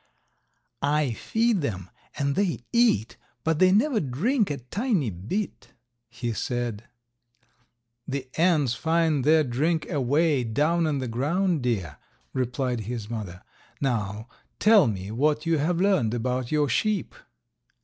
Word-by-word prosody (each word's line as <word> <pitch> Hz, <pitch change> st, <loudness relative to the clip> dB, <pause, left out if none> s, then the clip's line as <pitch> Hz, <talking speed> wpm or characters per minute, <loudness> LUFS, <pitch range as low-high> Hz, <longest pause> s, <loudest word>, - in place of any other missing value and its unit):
"I 145 Hz, -1 st, +1 dB
feed 225 Hz, -, 0 dB
them 95 Hz, -, -4 dB, 0.3 s
and 140 Hz, 0 st, 0 dB
they 195 Hz, -4 st, 0 dB
eat, 235 Hz, -, +2 dB, 0.3 s
but 160 Hz, -1 st, +1 dB
they 185 Hz, 0 st, +6 dB
never 225 Hz, +4 st, +3 dB
drink 195 Hz, -, 0 dB
a 145 Hz, -, -2 dB
tiny 170 Hz, -, -1 dB
bit," 110 Hz, -, -5 dB, 0.4 s
he 120 Hz, 0 st, -4 dB
said. 120 Hz, -2 st, -3 dB, 1.2 s
"The 135 Hz, -1 st, -4 dB
ants 160 Hz, -7 st, +3 dB
find 160 Hz, -1 st, +1 dB
their 155 Hz, +2 st, +5 dB
drink 150 Hz, +6 st, 0 dB
away 145 Hz, 0 st, +2 dB
down 155 Hz, +9 st, +1 dB
in 150 Hz, -2 st, 0 dB
the 130 Hz, -1 st, -3 dB
ground, 155 Hz, +8 st, 0 dB
dear," 110 Hz, -, -2 dB, 0.4 s
replied 125 Hz, -1 st, -1 dB
his 115 Hz, -3 st, -5 dB
mother. 100 Hz, -5 st, -6 dB, 0.4 s
"Now 110 Hz, -4 st, -2 dB, 0.3 s
tell 210 Hz, -, +6 dB
me 100 Hz, -2 st, -4 dB
what 150 Hz, +6 st, +1 dB
you 165 Hz, -2 st, +2 dB
have 165 Hz, +4 st, 0 dB
learned 185 Hz, -, +2 dB
about 125 Hz, +1 st, -2 dB
your 150 Hz, -1 st, +2 dB
sheep." 210 Hz, -, 0 dB
140 Hz, 130 wpm, -26 LUFS, 120-170 Hz, 1.2 s, they